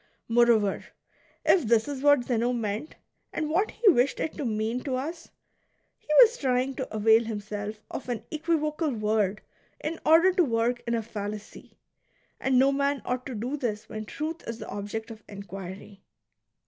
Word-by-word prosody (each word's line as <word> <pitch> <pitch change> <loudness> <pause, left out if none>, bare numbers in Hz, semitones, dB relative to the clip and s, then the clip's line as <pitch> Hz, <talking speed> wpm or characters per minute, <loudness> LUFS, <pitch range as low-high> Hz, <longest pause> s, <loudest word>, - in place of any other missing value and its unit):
Moreover, 230 -4 +3 0.6
if 340 -11 +4
this 225 +1 +3
is 280 -2 -4
what 290 -3 +5
Zeno 240 0 0
meant, 225 +4 -3 0.4
and 305 -1 -2
what 390 +7 +2
he 470 - -1
wished 275 -7 +4
it 315 - -2
to 295 - -4
mean 220 +2 -1
to 265 -3 -2
us, 320 +6 -5 0.7
he - - -36
was 470 0 +6
trying 260 0 +1
to 260 - -4
avail 220 +1 +4
himself 210 -1 -5 0.2
of 255 - -6
an 235 -3 -3
equivocal 310 0 0
word 210 -2 0 0.4
in 320 +2 -4
order 335 +4 +6
to 365 -1 +4
work 235 -2 0
in 235 - +1
a 225 - -1
fallacy; 210 -1 -7 0.6
and 265 -1 +2
no 270 +2 +5
man 280 -3 0
ought 250 0 -2
to 260 - -5
do 245 +7 -3
this 220 -6 -3
when 215 0 -5
truth 315 +7 -5
is 230 -1 -4
the - - -8
object 220 +3 -5
of 220 -1 -10
inquiry. 195 0 -9
240 Hz, 170 wpm, -27 LUFS, 215-290 Hz, 0.7 s, was